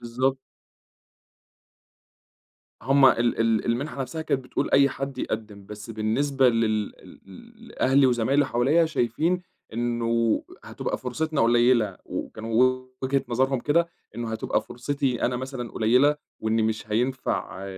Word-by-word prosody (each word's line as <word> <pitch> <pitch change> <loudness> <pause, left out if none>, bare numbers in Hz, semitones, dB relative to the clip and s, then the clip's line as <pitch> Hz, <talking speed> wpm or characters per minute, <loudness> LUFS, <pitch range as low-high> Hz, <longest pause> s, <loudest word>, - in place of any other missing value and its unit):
بالضبط. 130 +3 -1 2.4
هُم 135 +1 +4
ال 120 -2 +2
ال 115 -2 +2
المنحة 135 +4 -2
نفسها 145 +5 -4
كانت 135 -4 -1
بتقول - - -2
أي 140 0 +5
حد 135 0 -5
يقدِّم، 105 -4 -5
بس 105 +2 -9
بالنسبة 130 +5 +1
لل 110 -3 +1
ل - - -17
ل 95 -1 -15
لأهلي 135 +1 +3
وزمايلي 130 +4 +2
حواليّا 140 +9 +3
شايفين 160 +5 0 0.3
إنه 115 -1 0 0.2
هتبقى - - -4
فرصتنا 155 +4 -2
قليّلة، 120 -3 +3
وكانوا 110 +1 -6 0.5
وجهة 135 +1 0
نظرهم 130 +1 +1
كده، 170 +5 +2 0.3
إنه 115 -1 -4
هتبقى 110 - -1
فرصتي 135 0 -2
أنا 125 - +1
مثلًا 130 -2 -6
قليّلة 125 +7 +3 0.2
وإني 110 0 +1
مش 110 -1 -2
هينفع 120 -4 -2
120 Hz, 125 wpm, -25 LUFS, 115-135 Hz, 2.4 s, أي